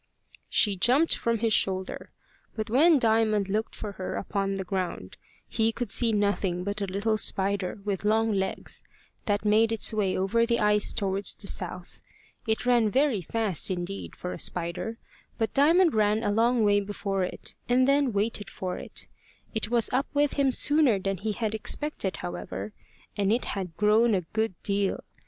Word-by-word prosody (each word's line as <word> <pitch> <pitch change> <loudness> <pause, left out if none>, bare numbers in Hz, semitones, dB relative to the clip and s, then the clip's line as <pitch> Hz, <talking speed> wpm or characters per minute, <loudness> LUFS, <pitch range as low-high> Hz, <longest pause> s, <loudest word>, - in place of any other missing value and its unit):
She 205 -2 +3
jumped 260 - +4
from 230 0 -1
his 225 0 0
shoulder, 190 -1 -1 0.5
but 215 -1 -4
when 310 +6 +5
Diamond 220 -4 +2
looked 215 +3 -2
for 210 - -6
her 190 -2 -5
upon 195 0 -2
the 195 - -3
ground, 185 -1 -4 0.3
he 225 -1 +1
could 245 +1 -4
see 235 -2 +2
nothing 200 -4 0
but 200 +2 -4
a 200 - -1
little 210 +3 0
spider 195 -1 +1
with 200 -2 -2
long 220 +1 +2
legs 190 -2 -2 0.4
that 205 0 0
made 220 +2 +3
its 225 0 +3
way 200 -3 0
over 195 +5 +1
the 235 0 +1
ice 210 0 +3
towards 195 -1 0
the - - -6
south. 180 -2 -4 0.5
It 220 +2 -1
ran 240 -3 +3
very 260 -3 +1
fast 205 -1 0
indeed 185 +1 -5
for 180 - -5
a - - -8
spider, 180 +6 -4 0.4
but 225 -2 -1
Diamond 330 +5 +4
ran 215 +1 +2
a 205 - +1
long 230 +2 +2
way 205 -1 +4
before 200 -1 -3
it, 180 - -6 0.2
and 255 +1 +3
then 280 -2 +3
waited 205 0 -2
for 185 -1 -5
it. - - -5 0.5
It 220 -1 -2
was 235 0 +2
up 265 +2 +1
with 290 0 +2
him 275 -2 +2
sooner 290 -4 +4
than 195 0 -2
he 215 +4 -3
had 220 -1 -2
expected, 220 -2 -1
however, 90 +3 -6 0.4
and 200 -1 +1
it 235 +3 +1
had 180 -5 -5
grown 215 +2 +3
a 185 - 0
good 215 +3 -2
deal. 200 -1 -1
210 Hz, 175 wpm, -27 LUFS, 195-230 Hz, 0.5 s, when